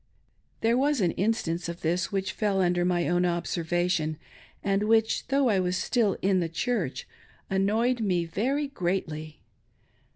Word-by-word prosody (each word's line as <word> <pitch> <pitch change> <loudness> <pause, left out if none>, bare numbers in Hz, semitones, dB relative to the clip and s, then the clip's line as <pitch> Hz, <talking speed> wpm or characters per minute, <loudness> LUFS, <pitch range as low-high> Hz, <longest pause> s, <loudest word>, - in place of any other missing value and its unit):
There 230 +2 +3
was 290 0 +2
an 180 -4 +2
instance 180 -5 -1
of 170 0 -7
this 170 +2 0
which 195 -1 -1
fell 205 -3 0
un^er 175 -1 +2
my 175 -1 +1
own 175 +1 +2
observation, 175 -2 0 0.5
and 200 +1 +1
which, 220 0 +2
though 275 -1 +2
I 200 -3 +3
was 180 0 0
still 220 -3 +1
in 190 -1 +3
the 170 -2 -1
Church, 180 - -2 0.4
ailhoyed 220 +6 +2
me 180 -6 +1
very 255 - -1
greatly. 165 - -3
190 Hz, 150 wpm, -27 LUFS, 175-220 Hz, 0.5 s, There